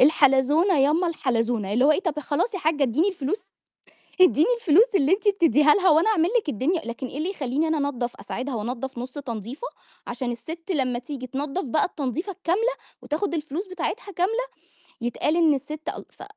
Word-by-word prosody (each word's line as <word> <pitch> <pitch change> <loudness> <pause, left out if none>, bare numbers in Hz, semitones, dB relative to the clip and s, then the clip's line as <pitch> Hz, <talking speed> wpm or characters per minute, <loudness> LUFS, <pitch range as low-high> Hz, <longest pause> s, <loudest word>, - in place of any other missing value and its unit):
الحلزونة 290 +5 +4
يامّا 305 +6 +3
الحلزونة، 235 - -1
اللي 250 +5 +3
هو 300 - +6
إيه - - 0
طَب 320 -6 -2
خلاص 300 - -1
يا - - -2
حاجّة 310 -3 0
إدّيني 275 - +2
الفلوس، 375 +2 -3 0.8
إدّيني 345 -3 +6
الفلوس 385 +2 +6
اللي 300 -2 +3
أنتِ 415 +2 +2
بتدّيها 300 - +4
لها 375 -3 +3
وأنا 325 +8 +4
أعمل 340 -4 +2
لِك 315 - -16
الدنيا، 295 - 0
لكن 235 +2 -5
إيه 270 - -7
اللي 335 +5 -1
يخلّيني 295 -2 -1
أنا 315 -1 +1
أنضّف 245 -3 -4
أساعدها 255 +1 -5
وانضف 245 +3 -4
نُص 250 +2 -5
تنضيفة 255 - -6 0.4
عشان 245 +1 -3
السِت 330 +9 -8
لمّا 255 -7 0
تيجي 255 0 -7
تنضّف 280 +7 -3
بقى 295 +3 +1
التنضّيفة 325 - -3
الكاملة 385 +7 0 0.3
وتاخد 335 +4 -2
الفلوس 315 +5 -3
بتاعتها 380 +4 -4
كاملة 440 +8 0 0.6
يتقال 245 +6 0
إن 325 -3 +5
السِت 300 +3 -5
أل - - -7
ف - - -12
300 Hz, 180 wpm, -24 LUFS, 260-355 Hz, 0.8 s, هو